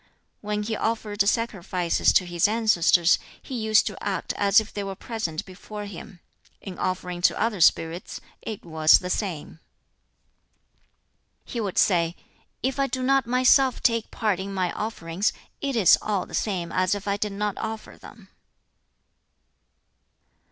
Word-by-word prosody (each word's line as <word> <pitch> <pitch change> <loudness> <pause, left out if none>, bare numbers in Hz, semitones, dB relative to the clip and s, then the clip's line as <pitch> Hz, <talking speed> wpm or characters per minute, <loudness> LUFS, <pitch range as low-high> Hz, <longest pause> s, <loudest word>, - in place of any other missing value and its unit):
When 210 0 -2
he 220 +1 -2
offered 215 -2 -1
sacrifices 195 -5 +1
to 185 - +4
his 175 0 +1
ancestors, 195 -6 +3 0.2
he - - -10
used 220 -2 +3
to 210 - -6
act 200 -2 -2
as 200 +1 +4
if 220 0 -7
they 205 - -3
were 195 -1 -5
present 195 -8 -4
before 205 +2 -8
him. 180 -2 -10 0.4
In 190 -3 -9
offering 180 -1 -3
to - - +3
other 215 -5 0
spirits 165 +2 +2 0.2
it 215 -4 -7
was 160 -1 +5
the 180 0 -5
same. 170 -6 -4 1.9
He 235 - -4
would 200 -4 -4
say, 170 -3 +3 0.5
"If 265 +2 -1
I 275 - +2
do 260 -1 -3
not 270 -2 +2
myself 255 +1 +3
take 230 -2 +1
part 210 -5 -1
in 195 +1 -5
my 180 -2 0
offerings, 195 -3 -2 0.3
it 275 -2 -2
is 205 -7 +6
all 205 -4 -1
the - - -15
same 180 -5 -2
as 185 +1 +1
if 205 0 -7
I 200 - +1
did 205 0 -3
not 205 0 -2
offer 220 0 -6
them." - - -15
205 Hz, 150 wpm, -25 LUFS, 180-220 Hz, 1.9 s, is